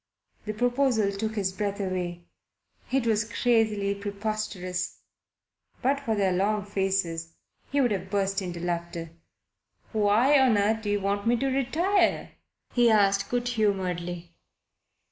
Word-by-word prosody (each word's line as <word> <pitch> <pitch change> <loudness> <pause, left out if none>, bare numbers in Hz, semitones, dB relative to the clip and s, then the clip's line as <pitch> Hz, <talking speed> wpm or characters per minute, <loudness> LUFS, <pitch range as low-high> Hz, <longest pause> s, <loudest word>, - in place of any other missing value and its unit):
The 215 0 -4
proposal 245 -3 +2
took 220 +2 -3
his 190 -3 -1
breath 200 +1 -3
away. 180 -3 -3 0.7
It 265 -2 +1
was 215 -2 +2
crazily 220 -3 +1
preposterous. 200 -3 -4 0.9
But 275 +2 +2
for 235 -6 -1
their 195 -3 +2
long 205 +2 0
faces 190 -5 -1 0.4
he 285 - +1
would 245 -4 +2
have 190 -2 -3
burst 195 -1 0
into 175 -2 -5
laughter. 170 -1 -4 0.8
"Why 220 +7 +4
on 255 -5 +4
earth 215 +2 +2
do 210 - -3
you 205 0 +1
want 200 +2 -1
me 240 +1 +4
to 270 - -1
retire?" 320 +9 +1 0.4
he 240 -1 +4
asked 200 -2 +3
good 245 0 -1
humouredly. 180 -6 -1
205 Hz, 135 wpm, -27 LUFS, 190-230 Hz, 0.9 s, Why